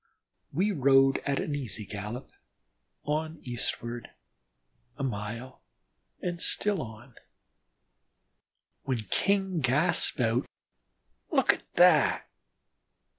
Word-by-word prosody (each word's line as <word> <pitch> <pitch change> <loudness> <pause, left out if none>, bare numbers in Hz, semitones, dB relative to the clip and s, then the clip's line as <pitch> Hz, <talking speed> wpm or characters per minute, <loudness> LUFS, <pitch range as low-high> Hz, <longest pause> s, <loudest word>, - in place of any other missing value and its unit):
We 190 +8 +1
rode 135 -4 +4
at 140 -1 +1
an 150 - -2
easy 115 -7 -3
gallop, 105 +5 -6 0.7
on 155 +2 -2
eastward, 120 -1 -4 0.9
a 140 - -4
mile, 115 +2 -5 0.6
and 175 -1 -4
still 205 -2 +2
on, 110 -3 -10 1.7
when 125 -5 -2
King 195 -3 +1
gasped 150 +4 +2
out, 120 +1 +1 0.8
"Look - - +4
at - - -12
that!" - - +5
135 Hz, 90 wpm, -29 LUFS, 115-160 Hz, 1.7 s, that